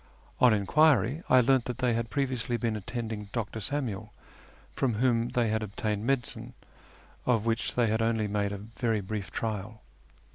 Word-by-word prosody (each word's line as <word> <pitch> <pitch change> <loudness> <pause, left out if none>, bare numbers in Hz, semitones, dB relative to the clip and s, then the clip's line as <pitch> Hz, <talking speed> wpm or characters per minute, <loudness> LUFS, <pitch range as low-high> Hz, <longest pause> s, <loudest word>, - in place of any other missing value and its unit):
On 125 - +7
enquiry 140 - +3
I 130 0 +7
learned 130 0 +3
that 125 - -4
they 125 -2 +1
had 115 0 -1
previously 130 -3 -1
been 115 -2 -1
attending 110 -1 -5
Dr. 115 -2 -3
Samuel, 110 -5 -3 0.6
from 125 -5 0
whom 120 0 +2
they 120 -2 +1
had 110 0 0
obtained 105 +1 -3
medicine, 120 -2 -1 0.7
of 115 -3 +2
which 115 0 -1
they 120 - +3
had 110 0 +1
only 115 -1 +1
made 100 0 -1
a 100 - -4
very 110 +1 -2
brief 100 -1 -4
trial. 110 -1 -4
115 Hz, 160 wpm, -29 LUFS, 110-125 Hz, 0.7 s, On